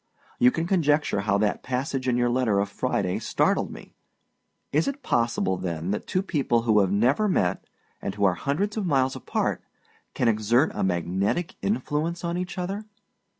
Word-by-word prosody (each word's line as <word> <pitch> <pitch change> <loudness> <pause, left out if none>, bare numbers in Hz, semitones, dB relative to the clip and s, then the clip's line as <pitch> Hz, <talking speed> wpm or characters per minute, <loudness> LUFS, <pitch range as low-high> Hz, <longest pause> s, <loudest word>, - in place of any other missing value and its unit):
You 125 - +7
can 165 +6 -2
conjecture 155 - +2
how 100 0 +1
that 105 0 0
passage 130 +1 -2
in 125 -1 +2
your 120 0 +2
letter 120 -5 +2
of 100 0 0
Friday 95 -2 -1
startled - - +1
me. - - -11 0.8
Is 155 +3 +2
it 280 0 -4
possible, 115 - +1
than, 85 -1 -3
that 105 - -3
two 185 - 0
people 135 - +1
who 110 -3 +4
have 95 -2 +2
never 125 - +3
met, 95 - 0 0.4
and 95 - -4
who 100 - -2
are 95 - +4
hundreds 155 - -1
of 205 -4 -1
miles 135 -4 +2
apart, - - -2 0.5
can 125 - +1
exert 115 +6 +3
a - - -2
magnetic 95 - 0
influence 170 -4 -1
on 170 0 -1
each 180 +1 -4
other? 195 +4 -3
125 Hz, 175 wpm, -25 LUFS, 100-165 Hz, 0.8 s, You